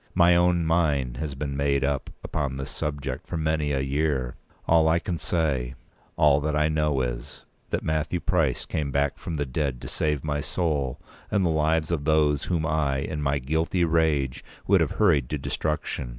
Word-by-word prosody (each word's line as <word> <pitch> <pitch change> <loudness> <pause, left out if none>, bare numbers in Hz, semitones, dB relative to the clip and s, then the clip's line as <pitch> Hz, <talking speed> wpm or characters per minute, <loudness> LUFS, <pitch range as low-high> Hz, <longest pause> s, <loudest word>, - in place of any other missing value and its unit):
My 85 -1 +6
own 85 -1 +3
mind 75 -7 +1
has 75 0 -4
been 70 0 -4
made 70 -1 +1
up 70 -1 -1
upon 70 -3 -2
this 65 - -5
subject 75 -2 -4
for 85 - -3
many 80 -2 0
a 70 -2 0
year. 70 -2 -1 0.3
All 80 -1 +5
that - - +4
I - - +3
can 85 -1 -3
say—all 70 -1 0
that 75 +1 -1
I 75 +1 +2
know 75 -3 +1
is—that - - -5
Matthew 80 +3 -1
Price 80 -8 0
came 75 -2 -2
back 70 +2 0
from 85 0 -5
the 75 -1 -1
dead 65 -1 -2
to - - -7
save 75 -3 -1
my 75 -1 -1
soul 75 -5 -1 0.3
and 100 -3 +1
the 85 - +2
lives 80 +1 +1
of 75 -4 -1
those 75 -2 +2
whom 85 -3 0
I, 75 -3 +1
in 75 +2 -3
my 70 0 +1
guilty 80 +6 0
rage, 80 -5 +1 0.2
would - - +4
have - - 0
hurried 75 - +3
to 75 - -1
destruction. 75 -2 -3
75 Hz, 185 wpm, -26 LUFS, 70-80 Hz, 0.3 s, My